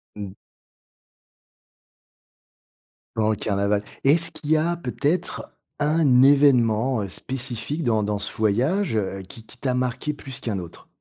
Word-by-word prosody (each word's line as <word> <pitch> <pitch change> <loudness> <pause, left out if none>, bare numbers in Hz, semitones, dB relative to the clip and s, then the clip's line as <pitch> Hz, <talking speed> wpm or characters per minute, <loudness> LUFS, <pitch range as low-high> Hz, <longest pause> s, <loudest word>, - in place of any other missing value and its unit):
Mmh. 100 -2 -6 2.8
Durant 110 0 +2
le - - +1
carnaval 100 0 0 0.2
et 140 - +7
est-ce 165 +1 +2
qu'il 150 - -5
y 160 - +6
a 170 +2 0
peut-être 165 +4 -2 0.3
un 150 -4 +4
événement 125 -5 +4
spécifique 130 - -4
dans 110 -4 +1
dans 105 0 -1
ce 100 - -3
voyage, 125 - +1
heu, 95 -2 -2
qui 110 +3 -11
qui - - -11
t'a 130 -2 -1
marqué 130 +3 -1
plus 135 -3 -8
qu'un 105 -5 -3
autre? 85 -2 -11
125 Hz, 135 wpm, -23 LUFS, 105-145 Hz, 2.8 s, et